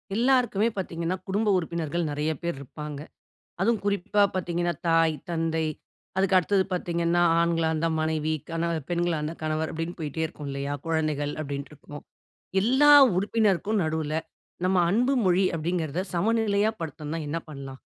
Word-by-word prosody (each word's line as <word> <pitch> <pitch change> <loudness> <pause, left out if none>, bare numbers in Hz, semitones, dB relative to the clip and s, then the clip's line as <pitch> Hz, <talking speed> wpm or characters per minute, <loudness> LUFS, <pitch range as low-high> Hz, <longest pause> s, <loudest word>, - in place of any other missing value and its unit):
எல்லாருக்குமே 240 -3 +3
பாத்தீங்கன்னா 170 -1 -2
குடும்ப 205 +2 +1
உறுப்பினர்கள் 170 -1 -2
நெறைய 150 +2 -1
பேரு 170 -2 -1
இருப்பாங்க. 150 +1 -7 0.6
அதுவும் 230 -2 +2
குறிப்பா 205 0 +1
பாத்தீங்கன்னா, 175 -1 -1 0.2
தாய், 165 -1 +4 0.2
தந்தை 165 -1 0 0.5
அதுக்கு 190 0 +3
அடுத்தது 190 +2 +2
பாத்தீங்கன்னா, 170 -1 0 0.2
ஆண்களா 165 -1 +2
இருந்தா 160 +1 0
மனைவி. 155 0 0 0.2
கண 165 +1 -1 0.2
பெண்களா 175 -1 0
இருந்தா 150 +2 -4
கணவர் 155 0 -1
அப்டின்னு 165 +2 -4
போயிட்டே 160 +1 -3
இருக்கும் 150 -2 -7
இல்லையா 140 +1 -3
குழந்தைகள் 155 -3 -1
அப்டின்னு 140 -1 -5
இருக்கும். 145 0 -11 0.6
எல்லா 265 +7 +5 0.3
உறுப்பினருக்கும் 205 0 +1
நடுவுல, 155 -1 -2 0.5
நம்ம 185 0 +2
அன்பு 250 +7 +2
மொழி 185 +1 +4
அப்படிங்கிறத 165 0 -2
சமநிலையா 215 +2 +2
படுத்தணும்னா 155 0 -4
என்ன 155 - -1
பண்ணலாம்? 135 -2 -8
170 Hz, 135 wpm, -26 LUFS, 155-190 Hz, 0.6 s, எல்லா